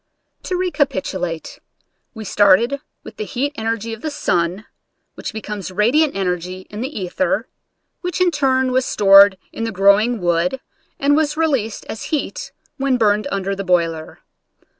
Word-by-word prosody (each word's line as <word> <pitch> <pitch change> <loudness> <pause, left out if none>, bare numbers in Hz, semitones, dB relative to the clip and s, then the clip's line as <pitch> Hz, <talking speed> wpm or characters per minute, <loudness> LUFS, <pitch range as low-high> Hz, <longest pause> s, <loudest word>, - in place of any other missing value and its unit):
To 365 - -1
recapitulate: 200 - -2 0.6
We 220 - -7
started 205 +7 +3 0.2
with - - -12
the 430 - -3
heat 285 - -2
energy 225 -1 -3
of 225 - -9
the 310 - -2
sun, 185 - -1 0.5
which - - -6
becomes 210 -3 -6
radiant 240 - +2
energy 180 -1 -2
in 210 +1 -6
the 260 - -2
ether, 190 +10 -1 0.5
which 360 -2 -4
in 365 -1 +3
turn 260 -4 +1
was 260 +1 +2
stored 200 -3 +6 0.2
in 225 - -4
the 225 - -2
growing 205 +4 +3
wood 175 +7 0 0.4
and 285 +1 +3
was 305 0 0
released 270 -10 -1
as 220 - -6
heat - - -3 0.3
when 270 -2 +1
burned 210 -3 +2
under 195 0 -2
the 195 - -4
boiler. 165 -3 -1
220 Hz, 150 wpm, -19 LUFS, 190-275 Hz, 0.6 s, stored